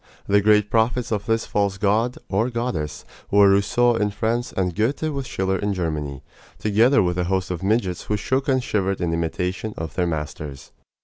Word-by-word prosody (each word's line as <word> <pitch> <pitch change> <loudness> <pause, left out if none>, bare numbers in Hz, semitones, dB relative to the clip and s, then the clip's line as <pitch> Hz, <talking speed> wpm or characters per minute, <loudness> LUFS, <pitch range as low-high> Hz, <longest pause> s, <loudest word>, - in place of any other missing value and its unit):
The 100 +1 +3
great 105 0 +3
prophets 115 +1 +1
of 105 0 -2
this 115 0 +1
false 100 -1 0
god, 110 +5 +1
or 110 +5 +1
goddess, 115 - -3 0.2
were 100 -1 +6
Rousseau 115 +5 +3
in 105 -2 +1
France 115 +3 -1
and 90 -2 -1
Goethe 115 - 0
with 135 -2 -4
Schiller 95 0 -1
in 100 -1 -1
Germany, 75 -6 -3 0.3
together 115 +6 +3
with 90 0 -1
a 90 - +1
host 95 0 -1
of 85 - -4
midgets 95 -3 0
who 105 - -1
shook 130 +6 -1
and 130 -2 +2
shivered 100 -3 -1
in 85 -2 -1
imitation 90 +5 -2
of 80 0 -5
their 90 -1 0
masters. 75 -3 -5
100 Hz, 185 wpm, -23 LUFS, 90-115 Hz, 0.3 s, were